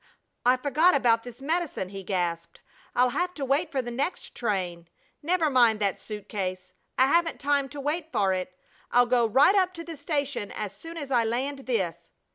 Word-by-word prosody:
"I 250 +1 +6
forgot 300 +6 +3
about 235 -4 +3
this 245 +2 -11
medicine!" 315 - -1
he 195 0 -7
gasped. 175 -3 -3 0.3
"I'll 250 +1 +4
have 360 +6 -1
to 280 - -3
wait 290 +5 +1
for 265 -2 -1
the 240 - -5
next 275 +9 -3
train! 180 -7 -2 0.3
Never 335 +1 +1
mind 240 -6 +4
that 200 -2 0
suit 210 -2 -8
case. 185 -2 -4 0.2
I 260 - +6
haven't 335 +4 +2
time 280 -1 +1
to 290 - -8
wait 310 +3 -2
for 200 -6 +2
it! 185 0 -4 0.3
I'll 245 0 +5
go 240 -1 +3
right 275 - +5
up 370 -2 +2
to 335 - -6
the 330 -1 -7
station 285 -6 -2
as 205 -2 -5
soon 330 +10 -9
as 285 -4 -6
I 240 -3 +4
land 265 +4 -2
this." 170 -8 -1
255 Hz, 195 wpm, -27 LUFS, 205-295 Hz, 0.3 s, I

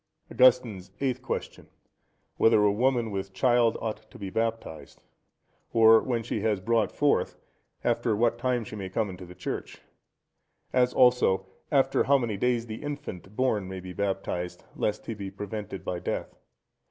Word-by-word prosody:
Augustine's 110 -7 +3
Eighth 130 -2 -1
Question.—Whether 115 -3 -2
a 105 - +5
woman 120 +1 +1
with 95 -1 -4
child 120 +2 +3
ought 110 -1 -5
to - - -13
be 100 -2 -6
baptized? 115 -8 -3 0.7
Or 110 -1 +7
when 120 -3 -1
she 110 -2 -3
has 105 -2 +1
brought 110 +1 +1
forth, 145 -1 +1 0.5
after 110 - +1
what 115 +2 +1
time 125 -1 0
she 110 - -8
may 95 -3 -5
come 100 +1 -1
into 90 0 -10
the 90 - -12
church? 90 - -5 0.9
As 125 -1 +3
also, 125 -8 +4 0.3
after 135 -2 +3
how 140 +1 +5
many 120 -5 -2
days 120 +2 0
the 110 -1 -7
infant 140 -10 -7
born 110 -7 +1
may 95 0 -6
be 90 0 -8
baptized, 95 -2 -3
lest 105 - -2
he 115 - -4
be 100 -2 -6
prevented 105 -2 -6
by 90 - -2
death? - - -4
110 Hz, 155 wpm, -27 LUFS, 95-120 Hz, 0.9 s, Or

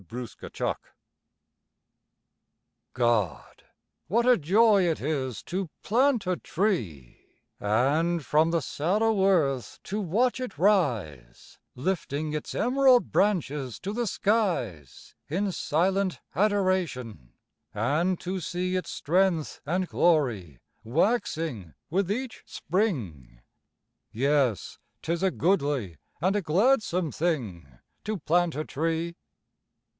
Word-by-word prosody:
GO 95 - -23
PLANT 120 +1 -8
A - - -6
TREE - - -2 2.2
God, 120 - -1 0.4
what 235 +6 +2
a 250 0 +6
joy 205 +4 +4
it 165 -2 0
is 130 -5 -3
to 185 -1 -3
plant 250 0 +2
a 180 -1 0
tree, 110 - -2 0.4
And 145 +10 +1
from 155 +2 +3
the 165 -1 +1
sallow 200 - +1
earth 145 -10 +1
to 210 +2 -3
watch 230 +9 +1
it 250 - -6
rise, 115 - 0 0.2
Lifting 150 0 -2
its 150 - -4
emerald 255 0 +4
branches 150 - 0
to 200 +2 -4
the 240 0 -1
skies 175 - -1 0.2
In 195 +6 0
silent 185 -1 0 0.2
adoration; 180 - 0 0.4
and 155 - 0
to 185 +1 -3
see 180 +2 -2
Its 185 - -2
strength 175 -1 0
and 180 +3 0
glory 120 - +1 0.3
waxing 155 - -1 0.2
with 190 +2 +1
each 250 +2 -4
spring. 105 - -2 0.7
Yes, 135 - 0 0.2
'tis 170 +1 -1
a 190 - +3
goodly, 145 - 0 0.2
and 185 +6 +1
a 205 - +1
gladsome 185 - +2
thing 120 - -2 0.4
To 215 0 -2
plant 175 +1 +1
a 155 +1 -3
tree. 165 +3 -2
170 Hz, 110 wpm, -27 LUFS, 130-195 Hz, 2.2 s, a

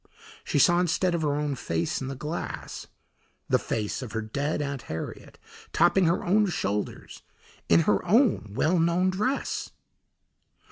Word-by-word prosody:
She - - -1
saw 175 +5 +5
instead 180 +1 +1
of 170 - 0
her 145 -2 +1
own 150 -1 -1
face 85 -7 -2
in 130 - -4
the 135 - -4
glass, 150 +5 -5 0.6
the - - +4
face 105 +2 -3
of 120 -4 -7
her 110 - -1
dead 140 +9 -2
Aunt 140 -3 -3
Harriet, 80 - -6 0.4
topping 175 +3 +4
her 165 +1 +1
own 210 +3 +3
shoulders 105 - -3 0.5
in 85 0 +6
her 100 +4 +2
own 205 - +3
well 170 +7 +2
known 170 +3 +2
dress! 215 +9 -2
150 Hz, 150 wpm, -27 LUFS, 120-180 Hz, 0.6 s, in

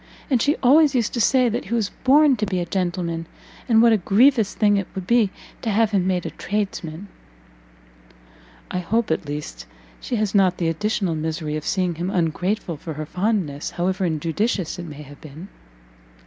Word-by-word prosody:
And 250 -4 +3
she 290 +2 +2
always 290 +2 +5
used 235 -4 0
to 235 - 0
say 255 +1 +4
that 230 - -2
he 235 - -2
was 220 -4 -1
born 285 +1 +5
to 210 -1 -1
be 185 -2 -1
a 175 - -2
gentleman, 175 -2 -2 0.4
and 225 -1 +5
what 235 -1 +6
a - - +4
grievous 220 +3 +3
thing 205 -2 +3
it 195 - -2
would 190 -2 -5
be 235 -1 +3 0.3
to 230 - -2
have 220 +1 +2
him 190 -3 +1
made 180 -2 0
a - - -4
tradesman." 195 -3 -4 1.6
"I 180 - -1
hope, 215 +3 0
at 160 - -1
least, 145 - -6 0.3
she 245 - -4
has 215 -3 -1
not 190 -3 +3
the 170 -2 0
additional 190 +1 -1
misery 155 -1 -3
of 155 - -5
seeing 185 -3 0
him 170 +3 -3
ungrateful 180 0 -1
for 160 +2 -7
her 155 +1 -5
fondness, 180 -5 -2
however 185 +2 -2
injudicious 170 +3 -1
it 175 - -6
may 150 -1 -9
have 145 0 -14
been?" 155 +6 -11
190 Hz, 190 wpm, -22 LUFS, 165-220 Hz, 1.6 s, what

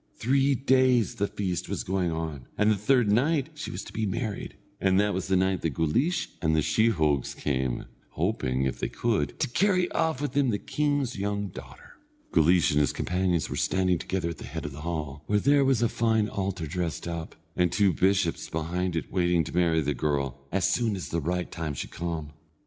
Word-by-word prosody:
Three 135 +3 +2
days 130 -4 +3
the 100 - +1
feast 95 -4 -3
was - - -2
going 95 -1 0
on, 80 -6 -4
and 105 +1 +4
the - - +3
third 110 +1 +3
night 140 +6 +2
she 150 - -6
was 90 - -5
to - - -11
be 110 -1 -1
married, 110 0 -3 0.2
and 95 0 +3
that 105 0 +2
was 95 - -2
the 95 - +2
night 95 0 +1
that 80 -5 -2
Guleesh 125 - +1
and 80 -2 +2
the 80 - +2
sheehogues 80 - +2
came, 65 -3 -1 0.3
hoping, 65 +1 0
if 65 -2 -2
they - - -2
could, 115 -3 -1
to 150 - +1
carry 185 +6 +2
off 160 -5 0
with 145 -2 -2
them 140 -1 +2
the 105 - +1
king's 145 -1 -1
young 100 0 -2
daughter. 70 -3 -12 0.3
Guleesh 85 0 +4
and 75 - +3
his 75 -3 +2
companions 90 -3 0
were - - -5
standing 90 -2 +1
together 90 -3 -2
at 85 - -7
the - - -8
head 80 +4 -6
of 75 - -4
the 70 +2 -9
hall, 75 -3 -4
where 105 - +2
there 140 +5 +4
was 135 -4 +2
a - - +4
fine 110 -2 +1
altar 95 -5 -3
dressed 85 +1 -3
up, 85 -2 -5 0.2
and 90 -1 +2
two 100 -3 +3
bishops 95 -3 +1
behind 85 +3 -2
it 80 - -3
waiting 90 -2 +2
to 80 - -7
marry 85 -2 +3
the 75 0 0
girl, 70 -1 -1
as 90 -1 +2
soon 115 -1 +1
as 95 - -6
the 85 - -1
right 90 +3 -2
time 80 -3 -4
should - - -5
come. 80 -3 -4
90 Hz, 210 wpm, -27 LUFS, 80-115 Hz, 0.3 s, and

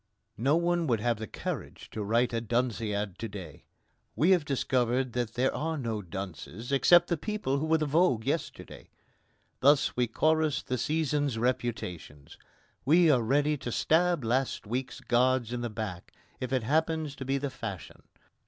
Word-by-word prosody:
No 135 +6 +3
one 170 0 +1
would 115 -4 +2
have 115 0 0
the 110 - -5
courage - - -6
to 110 - -5
write 115 +4 +1
a 115 - 0
Dunciad 110 -4 -1
to 115 - -3
day. 100 -4 -10 0.5
We 170 +6 +3
have 175 -5 +4
discovered 130 -2 0
that 120 -2 -2
there 130 +2 +1
are 160 +1 -2
no 115 -6 -3
dunces 95 - -7
except 175 +6 +5
the 170 - 0
people 205 -7 -2
who 155 - -2
were 160 0 +4
the 155 - -1
vogue 145 -6 +2
yesterday. - - -4 0.7
Thus 140 +1 +4
we 125 -1 +1
chorus 155 +4 +1
the 125 -1 -3
season's 150 -4 0
reputations. 110 - -3 0.5
We 165 +4 +5
are 130 -4 +3
ready 145 +6 +2
to 125 - -5
stab 170 +2 +2
last 125 +2 0
week's 125 +5 -4
gods 125 -1 +2
in 120 - -3
the 120 - -2
back 105 -5 -6 0.3
if 130 - -4
it 130 -3 +1
happens 155 +2 0
to - - -5
be 135 +1 0
the 140 0 -3
fashion. 100 -9 -7
130 Hz, 170 wpm, -29 LUFS, 115-150 Hz, 0.7 s, except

